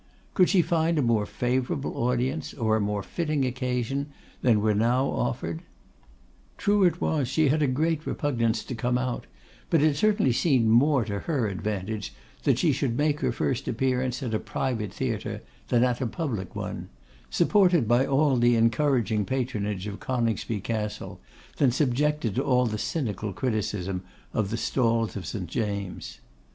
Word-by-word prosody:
Could 185 -3 +4
she 185 -4 +4
find 165 0 +1
a 145 - +2
more 110 -3 +2
favourable 125 +2 -1
audience, 125 +5 -1
or 110 -3 +1
a 110 - +1
more 100 0 -1
fitting 155 -5 -1
occasion, 130 +2 -2 0.3
than 115 -4 +4
were 105 +1 +2
now 120 +5 +2
offered? 85 -10 -2 1.0
True 205 -1 +2
it 175 - +2
was 145 -5 0
she 145 +3 +2
had 155 +3 +2
a 145 - +3
great 155 +4 0
repugnance 115 -6 0
to - - -6
come 125 +1 0
out; 125 - -3 0.4
but 160 -3 +3
it 155 -2 +3
certainly 205 - +3
seemed 125 -2 +2
more 130 +2 +4
to 100 -2 -3
her 135 -6 -1
advantage 100 -4 -4 0.3
that - - +4
she - - +3
should 115 - -1
make 150 0 +1
her - - 0
first 130 - -2
appearance 125 +2 0
at 120 -3 -3
a 110 - +1
private 115 -7 -2
theatre - - -3 0.2
than 120 0 +3
at 125 0 +1
a 125 - 0
public 115 - -4
one; - - -5 0.4
supported 180 - +3
by 120 +3 +4
all 140 0 +2
the 120 0 +4
encouraging 115 -2 +2
patronage 105 -6 -2
of 105 -1 -6
Coningsby 115 -4 -1
Castle, 110 0 -4 0.4
than 140 - +4
subjected 135 -1 +1
to - - 0
all 125 -1 +3
the 110 -2 -2
cynical 105 - -2
criticism 105 -4 -2 0.3
of 105 -3 0
the 115 - -2
stalls 115 -2 +1
of 95 -5 -5
St. 100 -5 -4
James'. 100 0 -4
125 Hz, 165 wpm, -26 LUFS, 110-140 Hz, 1.0 s, Could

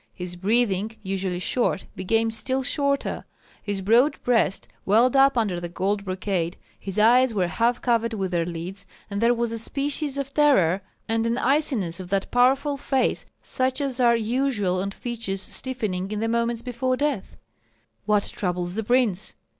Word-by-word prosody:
His 180 -1 -6
breathing, 210 +2 0
usually 190 -2 -2
short, 195 +2 0
became 225 +4 +1
still 260 +4 -1
shorter; 280 0 -1 0.4
his 200 -2 -4
broad 245 +8 +4
breast 230 -6 +1 0.2
welled 235 +6 +3
up 270 -1 +5
under 205 -6 0
the 175 0 -5
gold 200 +3 -1
brocade, 185 -2 -2 0.2
his 195 0 -6
eyes 240 +2 +5
were 185 -3 +2
half 230 +7 0
covered 230 -2 +1
with 190 -3 -2
their 170 -1 +1
lids, 175 +3 -6 0.2
and 200 +1 -2
there 235 +1 +4
was 235 -1 -1
a 230 - -3
species 280 +3 -2
of 275 0 -4
terror 200 - +4 0.3
and 225 0 0
an 235 +1 0
iciness 255 - +1
on 180 - -8
that 195 +1 -1
powerful 270 +4 +3
face 270 -1 0 0.2
such 260 +1 -1
as 270 -3 -2
are 240 -1 +5
usual 225 -5 0
on 200 - -2
features 205 -3 -4
stiffening 210 -8 -3
in 210 - -3
the 225 +2 -1
moments 235 0 0
before 255 +1 -1
death. 285 -8 -2 0.7
"What 210 -1 +3
troubles 180 -2 -3
the 225 +3 -2
prince? 220 -4 +1
225 Hz, 165 wpm, -24 LUFS, 195-255 Hz, 0.7 s, up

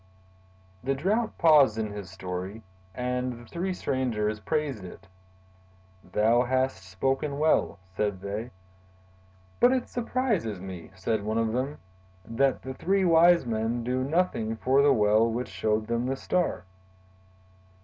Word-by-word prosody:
The 135 +2 0
Drought 210 - 0
paused 145 -9 +5
in 110 -2 -2
his 100 -3 -7
story, 95 +3 -6 0.3
and 125 +1 -2
the 120 0 -12
three 175 +9 -3
strangers 115 -10 -1
praised 140 -1 -2
it. 90 - -11 1.0
"Thou 110 +6 +2
hast 130 -7 -1
spoken 135 +9 -1
well," 155 -8 +2 0.2
said 105 -3 -1
they. 105 +4 -4 1.1
"But 245 +1 +5
it 255 -2 -1
surprises 230 - -1
me," 90 -3 -8
said 105 +3 -1
one 110 +2 -1
of 115 -1 0
them, 135 +4 -2 0.5
"that 130 +4 0
the 130 - -5
three 190 +7 +1
wise 170 -1 +5
men 115 +1 -1
do 125 +2 -1
nothing 140 -8 0
for 130 +5 +3
the 145 0 +5
well 110 -1 +4
which 120 +2 -3
showed 110 0 -1
them 115 +2 -1
the 135 - -1
Star. 170 - -1
120 Hz, 140 wpm, -27 LUFS, 110-145 Hz, 1.1 s, paused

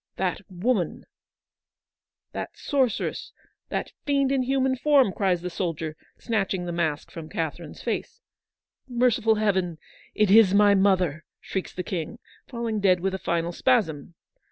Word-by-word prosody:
'That 185 -1 -1
woman 185 -1 -1 0.6
— - - -67
that - - -4
sorceress 265 -6 -1 0.2
— - - -51
that - - -3
fiend 275 -2 +1
in 270 -1 +2
human 265 0 +1
form! 270 -6 +4
' - - -19
cries 185 -4 +1
the 180 - -2
soldier, 165 -3 -3 0.2
snatching 195 -5 -1
the 175 - -3
mask 160 -3 -2
from 160 -2 -8
Catherine's 165 -3 -5
face. 455 - -3 0.3
— - - -67
' - - -57
Merciful 240 -3 +2
Heaven, 190 -6 0 0.4
it 210 -3 +3
is 205 -2 +7
my 205 0 +6
mother! 185 -5 +2
' - - -66
shrieks 190 - -4
the 180 - -3
King, 175 +4 -4 0.3
falling 235 -3 -3
dead 185 -3 +4
with 190 +2 -1
a 190 - -3
final 170 -1 -1
spasm. 175 - 0
195 Hz, 160 wpm, -25 LUFS, 175-235 Hz, 0.6 s, is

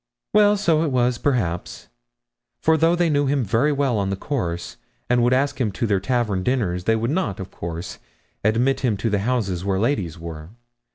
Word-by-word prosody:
'Well, 210 0 +5
so 165 -6 +2
it 165 - +1
was 125 -1 +1
perhaps; 100 -12 -2 0.7
for 160 +5 +3
though 165 +2 +3
they 175 -1 +2
knew 145 -2 +2
him 140 -1 +1
very 115 +8 +2
well 135 -6 +1
on 95 -1 -1
the 100 - -1
course, 90 - -4 0.3
and 125 0 +4
would 120 +1 +3
ask 135 +1 +1
him 110 -4 +1
to 115 - -1
their 100 -3 +1
tavern 110 -3 0
dinners, 90 -6 -1
they 115 - +3
would 115 +3 -1
not, 145 - -1
of 95 - -7
course, 85 0 -6 0.4
admit 120 +6 +2
him 115 -6 0
to 115 +2 -1
the 105 - +1
houses 100 -6 -1
where 95 -1 0
ladies 100 - -1
were. 80 -1 -8
120 Hz, 195 wpm, -22 LUFS, 95-140 Hz, 0.7 s, Well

